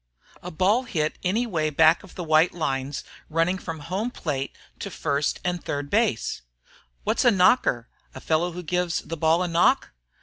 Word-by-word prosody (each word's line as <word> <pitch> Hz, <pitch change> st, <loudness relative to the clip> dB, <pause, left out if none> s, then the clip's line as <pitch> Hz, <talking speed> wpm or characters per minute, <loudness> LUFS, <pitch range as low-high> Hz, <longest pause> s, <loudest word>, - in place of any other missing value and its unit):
"A 180 Hz, -, -6 dB
ball 195 Hz, +9 st, +2 dB
hit 155 Hz, -9 st, -2 dB
any 215 Hz, +7 st, +1 dB
way 160 Hz, -9 st, -1 dB
back 160 Hz, +2 st, +4 dB
of 195 Hz, -, -15 dB
the 180 Hz, -, -4 dB
white 160 Hz, +2 st, +3 dB
lines 135 Hz, -3 st, -2 dB, 0.3 s
running 165 Hz, +4 st, +1 dB
from 160 Hz, -4 st, -6 dB
home 190 Hz, +10 st, -2 dB
plate 140 Hz, -, -4 dB, 0.2 s
to 200 Hz, -, -5 dB
first 145 Hz, -5 st, -1 dB
and 180 Hz, -1 st, -1 dB
third 145 Hz, 0 st, -4 dB
base." 215 Hz, -, +1 dB, 0.6 s
"What's -, -, +1 dB
a 245 Hz, -, +6 dB
knocker? 180 Hz, -, +3 dB, 0.3 s
A -, -, -6 dB
fellow 165 Hz, +5 st, 0 dB
who 180 Hz, +1 st, -6 dB
gives 180 Hz, 0 st, -1 dB
the 165 Hz, -, -6 dB
ball 160 Hz, +2 st, +2 dB
a -, -, -1 dB
knock?" 170 Hz, 0 st, +2 dB
165 Hz, 175 wpm, -25 LUFS, 155-180 Hz, 0.6 s, a